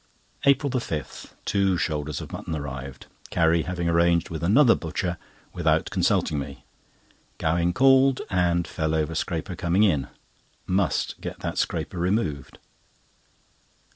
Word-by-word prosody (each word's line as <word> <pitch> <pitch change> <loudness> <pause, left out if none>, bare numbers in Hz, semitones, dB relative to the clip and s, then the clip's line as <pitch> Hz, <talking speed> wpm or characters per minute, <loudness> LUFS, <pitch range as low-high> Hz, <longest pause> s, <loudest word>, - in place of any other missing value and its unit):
APRIL 140 0 +4
5.—Two 95 - -2
shoulders 75 -4 -2
of - - -9
mutton 80 - -5
arrived, 65 -3 -6 0.2
Carrie 85 -1 +3
having 85 0 -3
arranged 85 0 +2
with 80 - -4
another 115 - +5
butcher 85 +1 -3 0.3
without - - +1
consulting 75 - +1
me. 70 0 -8 0.7
Gowing 85 +2 +1
called, 135 +4 +5
and 85 -2 +1
fell 80 0 -1
over 80 0 0
scraper - - -3
coming 90 +4 +2
in. 75 -10 +2 0.6
Must 95 -1 0
get - - -6
that - - -3
scraper 90 - -2
removed. 85 - -1
85 Hz, 120 wpm, -25 LUFS, 80-95 Hz, 0.7 s, another